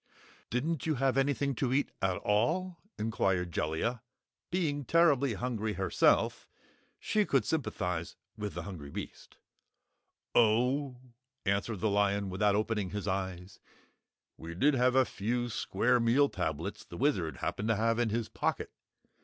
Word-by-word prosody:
"Didn't 150 +7 -1
you 155 - +2
have 135 -1 +1
anything 140 0 +1
to 125 0 -1
eat, 140 +2 +1
at 95 -1 +1
all?" 165 - 0 0.2
inquired 95 -5 0
Jellia. 80 +11 -1 0.5
Being 155 -5 -1
terribly 140 -6 +3
hungry 110 -2 -2
herself, 95 -1 +2 0.5
she 210 0 +1
could 135 -9 +1
sympathize 90 - -2 0.2
with 105 -2 -5
the - - -4
hungry 85 -8 -8
beast. - - -8 1.0
"Oh," 125 +4 +3 0.5
answered 100 +1 0
the 110 - +2
lion 100 -1 +1
without 100 +2 +2
opening 105 -2 0
his 105 0 -4
eyes, 95 0 -3 0.8
"we 85 +1 -8
did 145 - +3
have 125 0 +3
a 130 -1 +5
few 120 +4 -2
square 125 +2 +1
meal 125 +5 +4
tablets 80 -5 -3
the - - -10
Wizard - - 0
happened 105 - -3
to 115 - +3
have 115 +2 +1
in 120 -2 +2
his 115 +1 -1
pocket. - - -2
115 Hz, 140 wpm, -31 LUFS, 100-135 Hz, 1.0 s, a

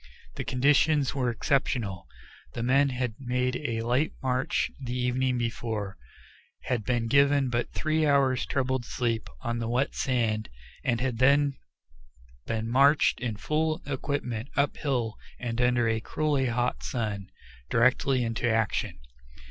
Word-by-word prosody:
The - - -4
conditions 145 +2 +3
were 130 -3 0
exceptional. 115 - -1 0.5
The 115 - -2
men 135 +3 +4
had 125 -3 -2
made 125 -1 -1
a 115 -6 -2
night 125 +6 +1
march 130 0 0
the 125 0 -3
evening 125 0 +1
before, 115 -4 -3 0.7
had 120 -4 -1
been 120 +1 0
given 140 +1 +4
but 120 -1 -1
three 155 -1 +1
hours' 135 -3 +2
troubled 130 -2 0
sleep 115 -1 -2
on 120 0 -2
the 115 -1 -2
wet 125 +3 0
sand, 115 -5 0 0.3
and 115 -3 +1
had 125 -2 -2
then 140 +2 +4 0.9
been 110 0 -2
marched 140 +5 +4
in 115 -4 -2
full 155 +6 -1
equipment 135 -4 -3
uphill 135 -5 0 0.2
and 120 -1 -3
under 125 -1 +3
a 110 0 +1
cruelly 145 +2 0
hot 120 +1 -1
sun, 105 -5 -3 0.4
directly 125 +2 +3
into 115 +1 -1
action. 115 -1 0
125 Hz, 135 wpm, -28 LUFS, 115-140 Hz, 0.9 s, men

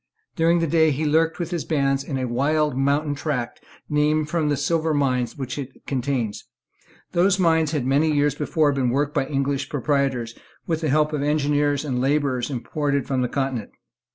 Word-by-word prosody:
During 170 0 +3
the - - +2
day 160 0 +3
he 150 +2 -1
lurked 160 +2 +2
with 170 0 -4
his 170 -3 -2
band 135 -3 0
in 135 -1 -4
a 130 - -1
wild 145 +4 +1
mountain 140 +2 +1
tract 140 -5 -3 0.3
named 150 +1 +1
from 160 -3 +1
the 145 - +1
silver 160 +2 0
mines 130 -3 0
which 135 0 -4
it 135 -1 -9
contains. 125 -5 -2 0.6
Those 185 +2 +3
mines 160 -4 +3
had 145 -5 -2
many 145 +4 +2
years 145 -1 +2
before 150 +1 +1
been 135 -3 0
worked 145 +4 0
by 135 - 0
English 140 -1 -1
proprietors, 135 -4 0 0.3
with 160 -1 -1
the 155 - 0
help 150 +2 +2
of 150 - -1
engineers 145 0 +1
and 125 -4 -1
labourers 135 -2 0
imported 140 +2 -2
from 130 -2 -1
the 125 - 0
Continent. 130 -6 -3
145 Hz, 180 wpm, -23 LUFS, 135-155 Hz, 0.6 s, During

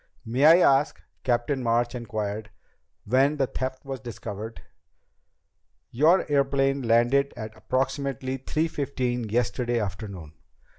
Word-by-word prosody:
"May 125 +6 +1 0.2
I 135 -1 +6
ask," 150 - -6 0.2
Captain 125 +2 0
March 120 +1 +1
inquired, 110 -3 -4 0.6
"when 135 +6 +3
the 135 - +2
theft 130 +1 -5
was 135 -1 -5
discovered?" 115 -2 -7 1.3
"Your 155 +9 +4
airplane 140 -1 +1
landed 120 +4 +2
at 110 -1 -7
approximately 130 +1 -2
three 155 +5 -1
fifteen 125 -6 -2
yesterday 120 +1 0
afternoon. 95 -6 -6
125 Hz, 110 wpm, -26 LUFS, 115-135 Hz, 1.3 s, I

